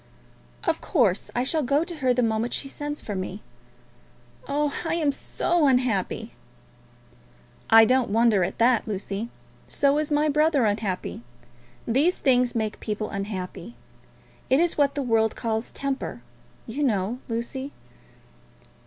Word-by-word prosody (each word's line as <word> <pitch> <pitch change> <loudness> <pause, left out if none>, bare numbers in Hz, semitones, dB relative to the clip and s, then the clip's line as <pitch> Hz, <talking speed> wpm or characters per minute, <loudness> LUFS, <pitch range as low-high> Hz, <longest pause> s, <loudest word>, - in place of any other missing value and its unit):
"Of - - 0
course, 225 - +1
I 245 - +1
shall 310 +4 0
go 285 +3 +2
to 340 -1 -7
her 260 -4 +2
the 250 0 +2
moment 225 +1 0
she 275 - -3
sends 290 +2 -5
for 210 - -4
me. 190 +1 -5 1.0
Oh, 290 0 0
I 330 -1 -1
am 310 -4 +2
so 330 +3 0
unhappy!" 250 -7 0 1.4
"I 225 0 +8
don't 255 0 +2
wonder 220 -2 +3
at - - -3
that, 235 -1 +3
Lucy. 205 +2 -3 0.4
So 280 +1 +2
is 305 - -1
my 300 0 +2
brother 300 -3 +3
unhappy. 205 - -2 0.7
These 285 +10 +2
things 250 -2 +2
make 220 -2 -2
people 215 0 -4
unhappy. 195 +1 -5 0.7
It 265 - +4
is 345 0 +2
what 280 -2 +2
the 285 - -1
world 225 -3 +2
calls 225 -1 -2
temper, 275 -1 -4 0.4
you 235 +6 -5
know, 225 -3 0
Lucy." 250 +4 -4
245 Hz, 140 wpm, -25 LUFS, 220-285 Hz, 1.4 s, I